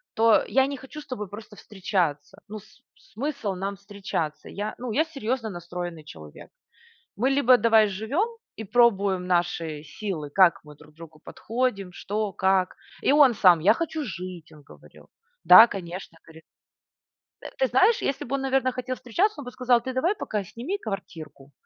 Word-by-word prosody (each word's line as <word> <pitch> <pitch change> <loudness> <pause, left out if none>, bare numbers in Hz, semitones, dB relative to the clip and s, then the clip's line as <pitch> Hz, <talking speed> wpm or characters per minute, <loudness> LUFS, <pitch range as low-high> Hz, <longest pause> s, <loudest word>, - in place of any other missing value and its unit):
то 225 0 +4
я 265 0 +2
не 280 - -4
хочу 270 +3 -11
с 300 - -12
тобой 210 -7 -6
просто 210 0 -11
встречаться. 185 -4 -3
Ну, 215 0 -7
с 250 - -21 0.3
смысл 240 -5 -3
нам 195 +2 -5
встречаться? 195 -6 -5
Я, 210 +2 -5
ну, 245 -1 -5
я 305 +8 +2
серьезно 260 -6 -3
настроенный 175 -2 -7
человек. 75 - -13 0.7
Мы 245 +6 +1
либо 265 -2 +5
давай 220 -1 +4
живем 220 - -1 0.3
и 220 - -7
пробуем 200 -5 +2
наши 170 -4 -1
силы, 165 -3 -6
как 180 +3 +4
мы 150 -1 -14
друг 150 +1 -19
другу 160 -2 -13
подходим, 225 -5 -3
что, 205 +3 -3
как. 190 -1 +1 0.3
И - - +2
он 285 -4 +6
сам: 180 -5 +5
"Я 180 - +5
хочу 320 -2 -3
жить!"- 180 - -8
он 150 -1 -17
говорил. - - -18 0.3
"Да, 225 - +10
конечно"- 180 -4 -8
говорит 160 -1 -15 1.0
Э, - - -7
ты - - +3
знаешь, 465 -2 +3
если 275 - -2
бы 270 +3 -2
он, 275 - -3
наверно, 265 -1 +1
хотел 255 0 -4
встречаться, 340 - -1
он 265 - -10
бы 250 - -7
сказал: 250 -2 +2
"Ты 260 +1 -5
давай 330 +11 0
пока 210 - -4
сними 245 - -5
квартирку, 165 - -8
210 Hz, 170 wpm, -25 LUFS, 180-255 Hz, 1.0 s, Да